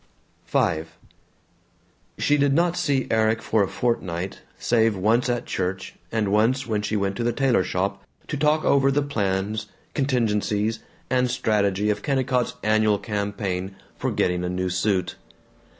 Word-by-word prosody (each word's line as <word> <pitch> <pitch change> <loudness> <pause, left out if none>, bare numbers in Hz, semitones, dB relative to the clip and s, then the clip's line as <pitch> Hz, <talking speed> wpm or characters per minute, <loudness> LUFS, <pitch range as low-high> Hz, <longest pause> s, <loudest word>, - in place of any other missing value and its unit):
V 80 -1 +1 1.3
She 145 - +2
did 140 -1 +2
not 170 +1 +2
see 135 -6 +1
Erik 110 0 +2
for 110 - +1
a 100 - +2
fortnight, 95 -5 -2 0.2
save 115 -2 +2
once 115 +6 +2
at 120 -1 -1
church 95 0 -3 0.2
and 110 -3 0
once 120 +6 +2
when 110 -2 -1
she 105 - -2
went 100 -1 -1
to - - -1
the 120 - +2
tailor 130 -5 +2
shop 95 +2 -2 0.2
to - - -3
talk 150 +2 +2
over 135 -1 +4
the 140 +1 +2
plans, 105 -4 -1 0.3
contingencies, 110 -5 0 0.3
and 125 -1 +2
strategy 105 -4 +1
of 105 - -3
Kennicott's 130 -3 0
annual 110 -1 +3
campaign 100 -2 -3 0.2
for - - -2
getting 90 0 0
a 90 - -1
new 90 0 -1
suit. 90 +1 0
110 Hz, 150 wpm, -24 LUFS, 100-125 Hz, 1.3 s, over